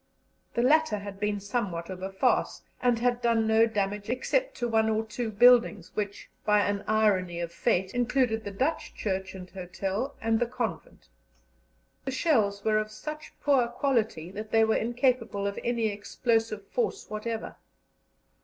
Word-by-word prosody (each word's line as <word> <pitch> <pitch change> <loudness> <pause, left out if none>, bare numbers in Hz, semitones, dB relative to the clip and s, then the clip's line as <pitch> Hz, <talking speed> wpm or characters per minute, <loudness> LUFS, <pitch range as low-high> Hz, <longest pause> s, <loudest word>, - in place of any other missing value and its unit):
The 235 - +2
latter 310 -3 +4
had 200 -1 -8
been 210 0 0
somewhat 195 -5 -3
of 185 0 -7
a 190 +1 -4
farce, 190 - +1 0.2
and 245 -2 +3
had 245 +1 +1
done 230 -2 +2
no 220 +1 +4
damage, 205 -1 -2
except - - 0
to 240 - -1
one 220 -1 +2
or 220 0 0
two 225 +1 -3
buildings 220 -4 +5
which, 205 -1 -4 0.2
by 210 -1 +4
an 205 0 -1
irony 195 -5 +2
of 170 -1 -3
fate, 185 +2 0
included 245 -2 +1
the - - -4
Dutch 265 +11 -2
church 190 -2 -3
and 180 -1 -8
hotel 195 +8 -4
and 225 0 +1
the 240 - +1
convent. 250 - -5 1.0
The - - -2
shells 220 -9 +1
were 215 -1 +3
of 215 0 -3
such 305 +7 -7
poor 270 -4 +4
quality 225 - -1
that 215 +2 -6
they 225 0 +4
were 220 0 +3
incapable 235 -3 0
of 200 0 -2
any 235 -2 +1
explosive 215 0 -1
force 445 -4 -2
whatever. 220 +1 -4
220 Hz, 165 wpm, -28 LUFS, 200-240 Hz, 1.0 s, buildings